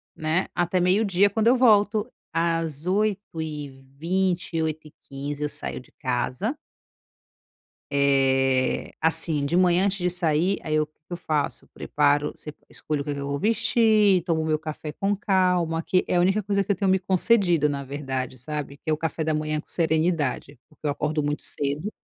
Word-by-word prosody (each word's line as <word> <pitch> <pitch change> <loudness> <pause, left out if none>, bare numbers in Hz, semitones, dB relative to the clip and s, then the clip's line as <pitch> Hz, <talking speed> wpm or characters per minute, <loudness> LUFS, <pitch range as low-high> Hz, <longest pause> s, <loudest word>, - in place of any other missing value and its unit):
né, 160 +4 0
até 175 +1 +1
meio-dia 195 +1 +3
quando 220 +2 0
eu 250 +2 +5
volto, 215 -1 +3 0.2
às 165 -2 -1
08h20, 165 -3 -2
08:15 145 -2 -5
eu 150 - -1
saio - - -5
de 130 - -18
casa 130 - -2 1.3
Eh, 135 -2 +2
assim, 160 -2 +2
de 170 +5 0
manhã 180 +1 +4
antes 200 0 +1
de 180 0 0
sair, 175 +2 +1
aí 155 -1 0
o 155 - +1
que 155 - -41
que - - -13
eu - - -4
faço? 155 -4 -2
Preparo 145 0 0
se 150 - -9
escolho 150 -2 -4
o 140 - -4
que 145 - -3
que 140 - -5
eu 140 - -4
vou 140 0 -2
vestir, 220 -2 +3
tomo 165 -3 0
o - - -2
meu 155 -1 +1
café 155 -1 -6
com 200 +4 -1
calma, 180 -5 +1
que 185 +2 +1
é - - 0
a 175 - +4
única 195 +4 +2
coisa 200 0 0
que 195 - -9
eu - - -3
tenho 195 -2 +1
me 190 - +4
concedido 185 -3 +2
na 140 -1 -2
verdade, 135 -2 -4
sabe, 140 +2 -6
que 155 - -5
é - - +3
o 155 - +1
café 160 0 -3
da 155 - 0
manhã 155 0 -1
com 150 - -9
serenidade, 160 -4 0
porque 155 0 -9
eu 145 - +2
acordo 150 +1 -1
muito 145 +1 -2
cedo 145 +8 -2
160 Hz, 180 wpm, -25 LUFS, 145-185 Hz, 1.3 s, eu